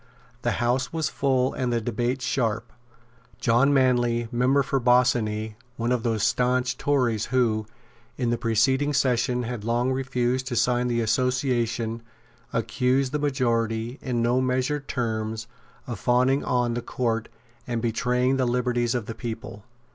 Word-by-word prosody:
The 120 - 0
House 125 +2 0
was 160 -3 -1
full 130 -2 +1
and 125 -2 -1
the 120 - +1
debate 120 +3 -2
sharp. 115 -6 -1 0.7
John 120 +4 +3
Manley, 120 -3 +2
member 130 +4 +3
for 135 0 0
Bossiney, 115 -3 +2 0.2
one 115 +1 -1
of 125 -2 +1
those 110 -3 0
stanch 125 +2 +1
Tories 125 -6 +1
who, 115 -4 +1 0.5
in 120 -2 0
the 120 - +1
preceding 130 +6 +2
session, 125 -2 +1
had 120 -2 -5
long 120 +3 +1
refused 130 -1 -1
to 120 - -3
sign 125 +1 +2
the 120 -1 0
Association, 120 -1 0 0.5
accused 125 +3 0
the 150 - -1
majority, 120 -3 -1
in 120 -3 -1
no 120 +2 +2
measured 130 +3 -1
terms, 110 -2 -2 0.4
of 120 -6 -6
fawning 130 +4 +2
on 120 -1 +1
the 120 - -2
Court 115 -2 -2 0.4
and 120 -2 -1
betraying 125 +3 +1
the 130 -2 +1
liberties 120 0 0
of 120 -3 -2
the 115 - -5
people. 115 -2 -7
125 Hz, 145 wpm, -25 LUFS, 115-130 Hz, 0.7 s, John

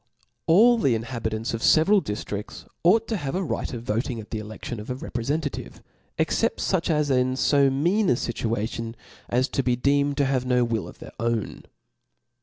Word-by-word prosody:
All 230 +8 +6
the 130 - +2
inhabitants 115 0 -3
of 115 - -2
the - - +3
ieveral 195 +6 +5
diftrids 105 0 -5 0.2
ought 215 +6 +4
to 220 - -1
have 140 -4 -4
a 190 - 0
right 170 - -3
of 120 -3 -6
voting 115 +2 -2
at 110 - -11
the 110 - -2
eledtion 110 +2 -7
of 105 - -9
a 125 - -2
re* 130 - -8
prefentativej 140 +7 -3 0.4
except 480 - +1
foch 185 -3 0
as 150 -3 +1
are 130 - +4
in 130 0 0
fo 140 +1 +3
mean 175 +10 +1
a - - +5
fitua 115 -2 -2
tion, 115 0 -6 0.3
as 125 +2 +2
to - - 0
be 125 -1 +1
deemed 140 +3 +1
to 140 - +3
have 135 -2 0
no 125 -1 +2
will 115 -3 -1
of - - -12
their - - -11
own. 115 -1 -2
130 Hz, 205 wpm, -25 LUFS, 115-150 Hz, 0.4 s, All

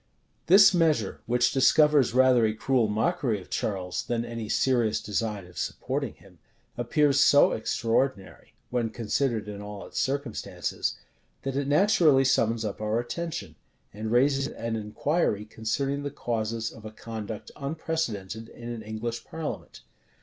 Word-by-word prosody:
This 195 +3 +8
measure, 155 - +1
which 120 +1 +2
discovers 140 -1 +4
rather 130 -2 +5
a 110 -1 +1
cruel 125 0 +1
mockery 110 +1 0
of 90 - -15
Charles, 95 -3 -2
than 120 -1 -2
any 115 -2 -6
serious 120 -5 +2
design 105 -2 -3
of 90 0 -10
supporting - - -3
him, - - -20 0.4
appears 140 +4 +3
so 145 - +6
extraordinary, 115 -1 -1 0.2
when 120 -2 0
considered 115 0 -1
in 105 -1 -7
all 105 -1 -8
its - - -5
circumstances, 140 +2 -2 0.5
that 135 -1 -3
it 140 0 -1
naturally 155 -4 +4
summons 115 -3 +2
up 105 0 -5
our 110 +2 0
attention, 155 - -5 0.4
and 110 +2 -4
raises 135 +3 +3
an 115 -4 -4
inquiry 105 - -1
concerning 135 +6 -2
the 145 - -3
causes 115 -3 -3
of 110 - -13
a 110 - -6
conduct 110 -1 -7
unprecedented 130 -8 -3
in 120 0 -9
an 120 -2 -5
English 110 +2 -5
parliament. 145 - -6
115 Hz, 140 wpm, -27 LUFS, 110-140 Hz, 0.5 s, This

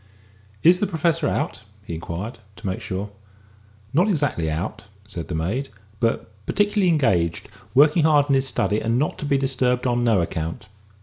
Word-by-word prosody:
"Is 180 +2 +6
the 205 - +1
Professor 165 -2 +1
out?" 145 -7 -2 0.2
he 85 - -6
inquired, 90 +7 -5 0.2
to - - -13
make 95 -1 -2
sure. 100 +2 -4 0.8
"Not 175 +8 +4
exactly 145 - 0
out, 95 +8 -4 0.2
sir," 105 -4 -4
said 80 - -5
the 90 - -3
maid, 105 +13 -2 0.3
"but 115 -1 0 0.2
particularly 205 -2 +2
engaged, 95 - +1 0.3
working 150 +4 +6
hard 150 -2 +5
in 140 - +2
his 135 0 +2
study, 105 -4 0
and 115 +2 +1
not 150 +4 -1
to - - -4
be 140 -1 +2
disturbed 130 -2 +1
on 120 -1 +1
no 115 -5 +3
account." 85 +2 -3
125 Hz, 175 wpm, -23 LUFS, 95-150 Hz, 0.8 s, Is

